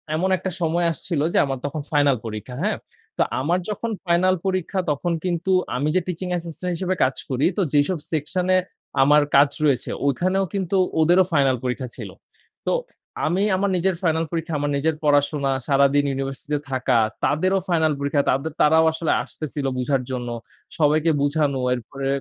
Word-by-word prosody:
এমন 185 +4 0
একটা 185 +1 -4
সময় 170 +1 +1
আসছিল 160 -1 -3
যে, - - +2
আমার 135 -1 -3
তখন 145 +1 -3
ফাইনাল 145 -3 +3
পরীক্ষা। 110 +3 -6
হ্যাঁ? 215 - 0 0.4
তো - - +1 0.2
আমার 170 +7 +1
যখন 230 +2 -3
ফাইনাল 180 +2 +3
পরীক্ষা 185 0 -1
তখন 160 +5 -1
কিন্তু, 175 +1 -1 0.2
আমি 140 +4 0
যে 185 - +3
টিচিং 180 +1 -4
অ্যাসিস্ট্যান্ট 175 +1 -4
হিসেবে 185 +2 -1
কাজ 130 0 +1
করি, 130 +1 +1
তো - - +2
যেসব 145 +5 +2
সেকশন 160 +4 -1
এ - - +5 0.4
আমার 150 +2 +6
কাজ 140 +1 +6 0.2
রয়েছে, 135 -4 +1 0.2
ওখানেও 185 +8 +1
কিন্তু 195 -1 -1 0.3
ওদেরও 175 +4 +5
ফাইনাল 135 -3 +3
পরীক্ষা 125 +1 -2
ছিল। - - -7 0.6
তো - - +2 0.5
আমি 175 +5 +1
আমার 200 +1 0
নিজের 185 +1 +1
ফাইনাল 165 -2 +1
পরীক্ষা, 165 0 -3
আমার 145 0 -1
নিজের 155 +3 0
পড়াশোনা, 145 -1 +2 0.2
সারাদিন 140 0 +4
ইউনিভার্সিটিতে 135 +2 -3
থাকা, 130 -1 +1 0.3
তাদেরও 185 +6 +2
ফাইনাল 160 -3 +2
পরীক্ষা, 140 +1 +1
তাদের 145 +3 -2
তারাও 160 +2 +5
আসলে 160 0 -1
আসতেছিল 150 -2 -6
বুঝার 135 +1 +1
জন্য। 120 -1 -3 0.5
সবাইকে 155 +1 +3
বুঝানো 145 -2 +1
এরপরে 135 +3 -5
155 Hz, 165 wpm, -23 LUFS, 140-175 Hz, 0.6 s, আমার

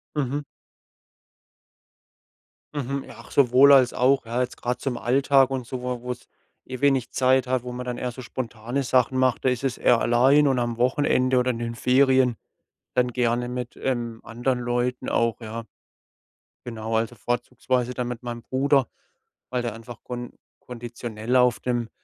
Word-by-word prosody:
Mhm. 145 0 -1 2.3
Mhm. 140 -1 -3
Ja, - - -12
ach, 115 - -13
sowohl 135 +1 +6
als 130 -3 +6
auch, 130 +1 +2
ja, 120 +2 -1
jetzt 125 -1 -3
grad 125 +1 -3
zum 130 -3 -2
Alltag 135 +2 +3
und 130 -3 -3
so 125 0 -5
wo 125 -1 -3
wo's 125 0 -6 0.4
eh 130 0 -7
wenig 135 -4 +2
Zeit 130 0 +3
hat, 130 -1 0
wo 125 +1 -7
man 125 0 -6
dann 125 -1 -4
eher 125 - -2
so 130 - -9
spontane 120 +1 -4
Sachen 130 0 +2
macht. 130 -1 +1
Da 130 - +5
ist 125 +1 -2
es 135 -3 -1
eher 120 - +4
allein 135 +5 +4
und 135 -2 +2
am 120 -1 -1
Wochenende 130 0 +2
oder 125 0 +2
in 115 - -6
den 115 0 -4
Ferien 130 0 +3 0.6
dann 125 -1 +2
gerne 120 0 0
mit, 125 -1 -5
ähm, 120 -3 -2
anderen 120 +2 -1
Leuten 125 +1 -2
auch, 115 0 +1
ja. 115 0 -6 1.0
Genau, 115 -2 -4
also 115 +2 -1
vorzugsweise 120 +2 -2
dann 125 -1 -2
mit 120 -1 -6
meinem 120 -1 -6
Bruder, 135 +1 +2 0.7
weil 125 -1 0
der 120 -3 -3
einfach 115 +1 -11
kon 120 -1 -6 0.3
konditionell 120 -1 -5
auf 125 -2 +4
dem, 120 -2 -2
125 Hz, 170 wpm, -24 LUFS, 120-130 Hz, 2.3 s, sowohl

